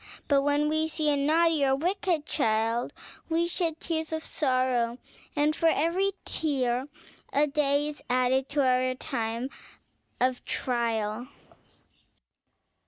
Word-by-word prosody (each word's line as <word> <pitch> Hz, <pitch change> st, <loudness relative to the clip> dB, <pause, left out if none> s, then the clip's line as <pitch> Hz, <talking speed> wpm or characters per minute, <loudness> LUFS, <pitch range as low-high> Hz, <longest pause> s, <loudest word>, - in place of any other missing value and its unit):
But 280 Hz, -3 st, +4 dB
when 290 Hz, +1 st, +2 dB
we 315 Hz, +1 st, +1 dB
see 310 Hz, -1 st, 0 dB
a -, -, +2 dB
naughty 315 Hz, +2 st, +3 dB
or 265 Hz, -1 st, +3 dB
a -, -, +4 dB
wicked 345 Hz, 0 st, 0 dB
child, 225 Hz, -4 st, 0 dB, 0.4 s
we 335 Hz, +1 st, +1 dB
shed 335 Hz, -2 st, -2 dB
tears 320 Hz, -1 st, -2 dB
of 320 Hz, 0 st, -2 dB
sorrow, 255 Hz, -4 st, +1 dB, 0.4 s
and 300 Hz, +1 st, +2 dB
for 330 Hz, -, +2 dB
every 350 Hz, +6 st, +1 dB
tear 260 Hz, -4 st, -1 dB, 0.4 s
a 290 Hz, +2 st, +3 dB
day 285 Hz, 0 st, +1 dB
is 300 Hz, -1 st, -7 dB
added 255 Hz, +1 st, +2 dB
to 280 Hz, -1 st, +1 dB
our 255 Hz, 0 st, +2 dB
time 230 Hz, +2 st, -3 dB, 0.7 s
of 255 Hz, 0 st, +1 dB
trial!" 230 Hz, -2 st, -1 dB
280 Hz, 130 wpm, -28 LUFS, 255-315 Hz, 0.7 s, But